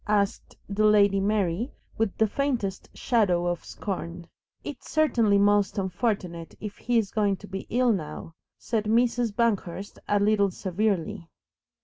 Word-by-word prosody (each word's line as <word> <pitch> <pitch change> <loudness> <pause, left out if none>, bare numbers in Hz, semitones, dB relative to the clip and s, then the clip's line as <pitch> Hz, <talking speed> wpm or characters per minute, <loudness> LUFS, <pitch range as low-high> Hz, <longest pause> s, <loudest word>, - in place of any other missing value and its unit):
asked 205 -1 0
the 205 +2 0
Lady 205 -2 +5
Mary, 205 - 0 0.2
with 220 -3 -1
the 220 - +4
faintest 230 -5 -2
shadow 195 -8 +2
of 175 -1 -1
scorn. 175 -3 -5 0.4
"It's 290 - -8
certainly 235 -10 +3
most 205 0 +3
unfortunate 185 -4 -2
if 210 -1 -6
he's 230 -4 +1
going 205 -3 +1
to 205 - -12
be 195 0 -6
ill 245 0 +3
now," 160 -2 -5 0.2
said 220 -3 -2
Mrs. 235 +1 +2
Banghurst 205 -4 -1
a 205 - +3
little 205 -1 +3
severely. 185 -3 -2
205 Hz, 135 wpm, -26 LUFS, 190-225 Hz, 0.4 s, Lady